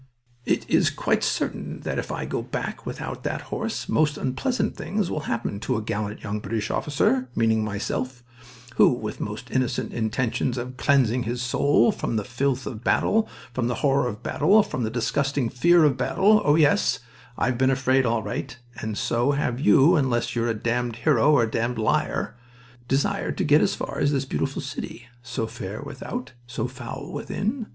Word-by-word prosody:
It - - +1
is - - +3
quite - - 0
certain - - -2
that - - -2
if - - -4
I - - -3
go - - -2
back - - -5
without - - -5
that - - -2
horse - - -3
most 150 -1 +2
unpleasant 245 - -1
things 205 -3 -2
will - - -1
happen 115 -3 -2
to 115 +2 -1
a - - -2
gallant 105 -1 -3
young 105 0 -3
British 110 0 -3
officer, 135 -3 +1
meaning 110 -1 +2
myself, 120 +4 -3 0.5
who - - +7
with 110 -3 -5
most 105 +4 -5
innocent 130 -2 -1
intentions 120 +2 -1
of 125 +1 -5
cleansing 130 -3 +3
his 120 +1 -2
soul 120 +1 +3
from - - -3
the 105 - 0
filth 130 +1 -1
of 115 -3 -6
battle, 220 - +2 0.2
from 120 -1 0
the 120 - -1
horror 135 -2 +3
of 105 -3 -6
battle, 210 +2 +4
from 130 - -4
the 110 - 0
disgusting 135 +2 0
fear 170 +7 +4
of 140 -4 +3
battle 205 +11 +3
oh 145 0 +5
yes, 150 -2 +3 0.4
I've 125 -1 0
been 130 0 +4
afraid 130 0 +3
all 115 -2 0
right, 105 +3 -4 0.2
and 110 -1 -4
so 120 +5 +1
have 130 -4 -1
you 155 +4 +6
unless 130 -7 +1
you're 115 0 +1
a 115 - 0
damned 120 +1 -1
hero 140 +3 +3
or 140 -6 +5
a 110 - -2
damned 115 +2 -1
liar 110 - 0 0.5
desired 135 +2 0
to - - +1
get - - +5
as - - +2
far - - -5
as 145 - +2
this 135 -2 0
beautiful 75 - -2
city 120 +1 -7
(so 120 -2 -3
fair 110 -3 -6
without, 245 - -6 0.2
so 120 -1 -3
foul 130 +1 -7
within!) 220 +3 -3
125 Hz, 185 wpm, -25 LUFS, 115-140 Hz, 0.5 s, who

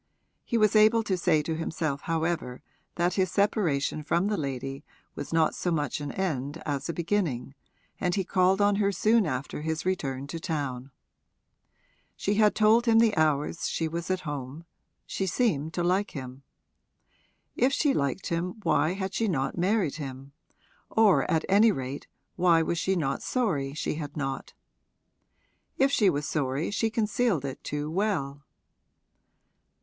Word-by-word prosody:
He 235 - -1
was 215 -1 +3
able 215 +2 +5
to 195 -3 0
say 170 -4 +2
to 160 - -2
himself 155 -3 -2
however 165 -6 -2 0.3
that 175 +1 +1
his 185 -2 +1
separation 180 -9 +1
from 170 +4 +1
the 210 - +1
lady 135 -3 -4 0.3
was - - -7
not 165 -1 +3
so 180 - -2
much 150 -4 -1
an 145 -1 -4
end 150 -5 -2
as 145 +1 -3
a - - +2
beginning, 165 -8 -1 0.5
and 180 -1 0
he 195 - 0
called 185 +1 +2
on 205 0 +3
her 200 -1 +2
soon 215 0 +3
after 130 +1 -4
his 160 +2 -3
return 140 -8 -2
to 165 +4 -6
town. 140 -6 -3 1.3
She 200 - -1
had 210 0 +3
told 220 +3 +4
him 225 -1 +5
the 225 -2 +4
hours 155 0 +1
she 165 - -1
was 170 +2 -5
at 185 -1 0
home 145 +1 -6 0.4
she 190 - -3
seemed 170 - 0
to 175 - 0
like 185 +4 +1
him. 130 -1 -7 1.1
If 255 +2 +3
she 285 0 +2
liked 140 +7 -1
him 170 +1 -2
why 155 0 +2
had 190 0 -4
she 225 - 0
not 135 -8 -1
married 180 -3 +1
him 135 -2 -7 0.6
or 220 -4 +4
at 160 - +1
any 210 +3 +5
rate 135 -3 -5 0.3
why 170 -2 +4
was 170 +1 -1
she 190 +3 +1
not 140 -6 -1
sorry 150 - -1
she - - -2
had 145 0 -7
not? 135 -2 -4 1.2
If 270 +1 +3
she 210 -7 +4
was 145 -3 -1
sorry 140 +2 -1
she 225 +2 0
concealed 220 - 0
it 135 - -6
too 150 0 -3
well. 160 -8 -1
170 Hz, 160 wpm, -27 LUFS, 145-200 Hz, 1.3 s, able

